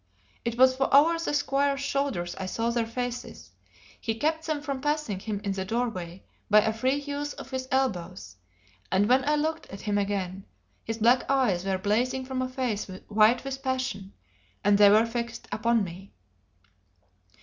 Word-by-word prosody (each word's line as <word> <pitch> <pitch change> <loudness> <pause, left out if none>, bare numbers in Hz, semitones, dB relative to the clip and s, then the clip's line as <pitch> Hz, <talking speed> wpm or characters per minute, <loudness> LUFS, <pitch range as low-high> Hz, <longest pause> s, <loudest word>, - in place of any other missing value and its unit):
It 235 0 -3
was 260 0 +5
over 300 +5 +5
the 330 - -2
squire's 280 -1 +1
shoulders 275 -11 -1
I 190 - -3
saw 230 +4 -1
their 235 -1 0
faces; 230 - -5 0.5
he 225 - -2
kept 315 +7 -1
them 310 -2 -1
from 275 -3 -3
passing 295 -9 -1
him 205 0 -4
in 200 - -1
the 195 -1 -2
doorway 195 -5 -3 0.3
by 210 0 +7
a 220 - 0
free 255 +5 +1
use 285 0 -4
of 265 - -10
his 260 0 -3
elbows; 185 - -2 0.6
and 200 +2 +3
when 255 +2 +4
I 300 - +4
looked 315 +2 -2
at 195 - -9
him 205 -1 0
again, 195 -1 -3 0.4
his 225 0 -4
black 235 +3 +3
eyes 230 -10 +2
were 190 -1 0
blazing 245 +7 0
from 260 0 -3
a 255 - -2
face 255 -5 -2 0.2
white 215 +3 +4
with 270 0 -5
passion, 255 -7 -3 0.5
and 205 0 +5
they 205 -1 +8
were 215 +3 +5
fixed 235 0 -5
upon 230 0 +2
me. 185 +2 -9
235 Hz, 170 wpm, -27 LUFS, 200-270 Hz, 0.6 s, they